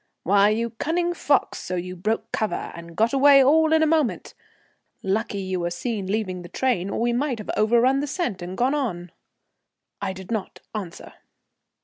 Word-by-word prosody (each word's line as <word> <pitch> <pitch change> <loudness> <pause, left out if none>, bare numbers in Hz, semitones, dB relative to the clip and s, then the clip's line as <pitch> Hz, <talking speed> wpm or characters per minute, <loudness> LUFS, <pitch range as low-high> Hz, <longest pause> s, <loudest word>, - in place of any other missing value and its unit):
"Why, 200 +2 +4
you 230 +2 -1
cunning 340 +8 -1
fox, 290 -4 +1
so 185 - -4
you 180 +1 -4
broke 215 +5 -2
cover 215 - -2
and 170 0 -11
got 225 +3 +2
away 275 0 +7
all 315 +4 +4
in 320 0 +4
a - - +5
moment! 310 -5 0 0.7
Lucky 205 +2 -1
you 190 -1 -2
were 175 0 -1
seen 200 +2 -3
leaving 190 -3 -2
the 175 - -10
train, 230 -8 0
or - - -3
we 240 +1 +1
might 260 0 0
have 210 - -5
overrun 240 +5 +3
the 290 - -2
scent 290 - -2
and 180 +2 -6
gone 255 +3 +2
on." 180 - -3 0.9
I 195 -1 -2
did 190 +2 -10
not 220 -4 -3
answer. 195 -6 -7
220 Hz, 180 wpm, -24 LUFS, 185-270 Hz, 0.9 s, away